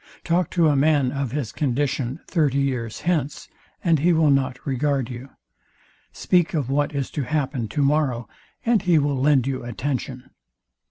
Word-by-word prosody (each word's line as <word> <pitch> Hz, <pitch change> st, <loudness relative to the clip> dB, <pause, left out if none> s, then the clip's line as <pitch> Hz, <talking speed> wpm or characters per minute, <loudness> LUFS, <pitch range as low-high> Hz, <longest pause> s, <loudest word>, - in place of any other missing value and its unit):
Talk 170 Hz, 0 st, +1 dB
to 165 Hz, -2 st, +5 dB
a 150 Hz, -, +3 dB
man 140 Hz, -2 st, +3 dB
of 135 Hz, -3 st, -3 dB
his 135 Hz, -5 st, -3 dB
condition 135 Hz, 0 st, -1 dB
thirty 150 Hz, -6 st, +1 dB
years 125 Hz, -5 st, -2 dB
hence, 155 Hz, -5 st, -1 dB, 0.4 s
and 165 Hz, -4 st, +3 dB
he 170 Hz, +4 st, +3 dB
will 160 Hz, -2 st, +4 dB
not 130 Hz, -2 st, +1 dB
regard 135 Hz, -2 st, -1 dB
you. 125 Hz, +3 st, -8 dB, 0.8 s
Speak 175 Hz, -2 st, +1 dB
of 135 Hz, -4 st, -1 dB
what 145 Hz, +1 st, 0 dB
is 140 Hz, -2 st, -2 dB
to 145 Hz, -, -3 dB
happen 135 Hz, -4 st, -2 dB
tomorrow, 140 Hz, -1 st, 0 dB, 0.4 s
and 230 Hz, -2 st, +3 dB
he 175 Hz, -4 st, +3 dB
will 140 Hz, -3 st, 0 dB
lend 140 Hz, -3 st, +3 dB
you 135 Hz, -2 st, -3 dB
attention. 130 Hz, +1 st, -4 dB
140 Hz, 160 wpm, -23 LUFS, 130-155 Hz, 0.8 s, to